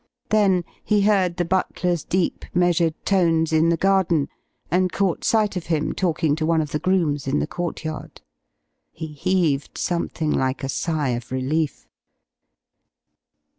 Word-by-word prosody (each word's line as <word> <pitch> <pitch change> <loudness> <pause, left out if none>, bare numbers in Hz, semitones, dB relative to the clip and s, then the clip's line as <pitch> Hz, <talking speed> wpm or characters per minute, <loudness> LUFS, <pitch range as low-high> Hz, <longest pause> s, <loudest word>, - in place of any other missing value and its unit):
Then 195 -4 +3 0.2
he 210 -1 +2
heard 190 -4 +2
the 175 - 0
butler's 180 -2 0
deep, 185 -1 -1
measured 175 -2 +2
tones 165 -4 +2
in 160 +1 +4
the 170 - +2
garden, 185 -5 +2 0.4
and 180 +1 +2
caught 195 -4 0
sight 215 -3 +2
of 180 - -4
him 155 -2 0
talking 160 -5 +1
to 160 - -2
one 165 -1 +3
of 150 -2 -2
the 150 - -1
grooms 165 -7 0
in 135 +2 +1
the - - 0
courtyard. 160 -1 -5 0.7
He 160 - -7
heaved 155 -3 0
something 165 -3 -1
like 130 -1 0
a 135 - -2
sigh 155 0 -1
of 120 0 -4
relief. 140 +4 -1
170 Hz, 145 wpm, -23 LUFS, 155-185 Hz, 0.7 s, in